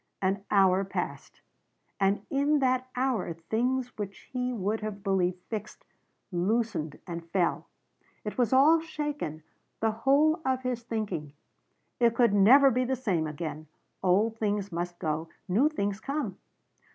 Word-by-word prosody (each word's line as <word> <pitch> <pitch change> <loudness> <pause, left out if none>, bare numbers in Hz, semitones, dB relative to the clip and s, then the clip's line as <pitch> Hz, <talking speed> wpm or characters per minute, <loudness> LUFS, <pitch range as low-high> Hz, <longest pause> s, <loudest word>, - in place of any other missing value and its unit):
An 195 +1 0
hour 195 -1 +4
passed. 195 - -5 0.6
And 200 +1 +1
in 285 +2 +3
that 255 -2 +1
hour 250 -9 0
things 245 +9 -1
which 200 -1 -6
he 250 0 -1
would 215 -1 -1
have 210 -2 -5
believed 185 -3 +1
fixed 215 -2 -7 0.5
loosened 185 -4 -1
and 170 -2 -7
fell. 175 -1 0 0.6
It 210 - -4
was 245 -3 +1
all 290 +5 +6
shaken 295 - -4 0.4
the 220 0 +2
whole 285 +8 +3
of 260 -1 0
his 250 -2 -2
thinking. 200 -11 -4 0.7
It 235 -1 +4
could 235 -3 +4
never 260 +8 +7
be 255 +1 +1
the 260 +1 0
same 190 -11 0
again. 155 0 -5 0.3
Old 210 +5 +2
things 205 -2 -1
must 175 +1 -3
go. 160 0 -2 0.2
New 225 +11 +3
things 205 -9 -2
come. 280 +6 -3
215 Hz, 140 wpm, -28 LUFS, 185-255 Hz, 0.7 s, never